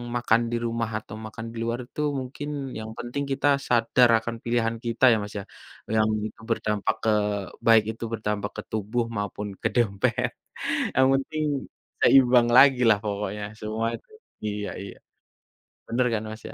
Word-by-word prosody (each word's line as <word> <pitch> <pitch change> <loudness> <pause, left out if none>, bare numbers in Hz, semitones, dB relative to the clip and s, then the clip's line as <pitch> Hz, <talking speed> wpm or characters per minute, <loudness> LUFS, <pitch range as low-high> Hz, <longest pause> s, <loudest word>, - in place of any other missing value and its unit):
makan 120 -1 +3
di - - 0
rumah 115 -1 -1
atau 105 - -11
makan 110 +1 -7
di 115 - -10
luar 115 +1 -2
itu 150 - -5 0.2
mungkin 140 +3 -6 0.3
yang 110 0 -6
penting 135 +4 -3
kita 135 +2 +1 0.2
sadar 120 +1 +4
akan 115 +1 -5
pilihan 115 -1 0
kita 115 +2 -3
ya, 115 - +4
Mas, 105 - -8
ya, - - -6 0.5
yang 110 0 +4 0.2
itu 115 - -14
berdampak 105 -2 0
ke 110 - +2 0.6
baik 110 -1 +7
itu 115 - -9
berdampak 105 -1 -2
ke - - -3
tubuh 110 +3 -1
maupun 105 0 -3
ke - - +2
dompet, 100 -5 +1 0.7
yang 130 0 +5
penting 155 +3 -1 0.6
seimbang 125 -3 +6
lagi 135 -2 +7
lah 105 -2 +5
pokoknya 105 0 -3 0.2
semuanya, 110 +2 -2 0.5
iya 105 0 -3
iya. 100 - -9 0.9
Bener 125 +2 +1
kan 110 0 -1
Mas, 110 +1 -9
ya? - - -10
115 Hz, 160 wpm, -25 LUFS, 105-120 Hz, 0.9 s, baik